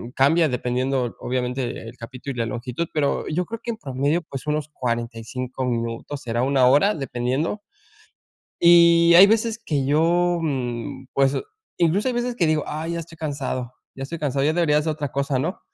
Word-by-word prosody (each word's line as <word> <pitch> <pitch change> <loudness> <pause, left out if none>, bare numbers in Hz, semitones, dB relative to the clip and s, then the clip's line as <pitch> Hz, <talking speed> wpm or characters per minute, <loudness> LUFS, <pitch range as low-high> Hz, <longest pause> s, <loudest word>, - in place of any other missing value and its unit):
cambia 160 +5 +4
dependiendo 125 0 -1
obviamente 125 +1 -2 0.3
el 120 - -14
capítulo 130 +3 -7
y - - -6
la 115 - +1
longitud, 125 +8 -4
pero 145 -2 0
yo 180 +4 -1
creo 230 +3 -7
que 240 - -2
en 225 - -6
promedio, 140 +2 -1
pues, 135 -4 -8
unos 150 0 -1
45 120 0 -4
minutos 115 +4 -3
será 120 0 -1
una 135 -1 +3
hora 145 +11 +4
dependiendo, 135 - -2 1.0
y 170 0 +6
hay 185 +3 +10
veces 225 +1 +1
que 145 -4 0
yo, 170 +4 +2
mm, 130 -2 -3
pues, 135 0 +3 0.4
incluso 175 +7 +2
hay 250 - -1
veces 240 0 -2
que 175 - +2
digo: 155 -1 +1
"ay, 160 +3 -4
ya 170 - -2
estoy 165 0 -12
cansado 135 -5 -3 0.2
ya 135 - -6
estoy 165 +4 -6
cansado, 140 -2 -1
ya 155 - +3
debería 150 -4 +3
ser 155 0 -1
otra 145 -2 -4
cosa, 140 -1 0
¿no?", 170 +8 -3
140 Hz, 180 wpm, -23 LUFS, 125-170 Hz, 1.0 s, hay